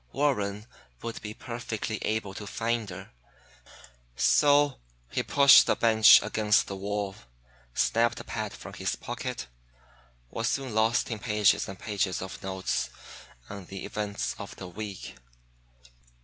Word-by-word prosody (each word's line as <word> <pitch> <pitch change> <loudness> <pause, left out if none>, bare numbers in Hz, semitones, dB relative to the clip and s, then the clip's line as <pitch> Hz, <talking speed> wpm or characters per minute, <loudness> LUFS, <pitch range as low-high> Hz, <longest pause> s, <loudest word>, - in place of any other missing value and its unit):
Warren 105 -7 0 0.4
would 115 - -5
be 105 0 -7
perfectly 115 -2 -4
able 110 -3 -2
to 105 +1 -8
find 115 0 -2
her; 90 - -9 1.0
so 145 - +4 0.3
he - - 0
pushed 140 -1 +7
the - - +3
bench 110 -2 +7
against 105 0 +2
the 100 - -6
wall, 100 0 -3 0.6
snapped 115 +1 +2
a - - -7
pad - - -4
from - - -10
his - - -2
pocket, - - -5 0.9
was 115 0 -2
soon 135 -4 -2
lost 110 +3 +2
in 110 - -3
pages 105 -4 +2
and 95 - -7
pages 100 -3 -2
of 95 0 -7
notes 95 0 -2 0.6
on 100 -2 -8
the 95 +1 -7
events 105 -1 -3
of - - -8
the 90 - -8
week. 100 +1 -7
105 Hz, 135 wpm, -28 LUFS, 100-115 Hz, 1.0 s, pushed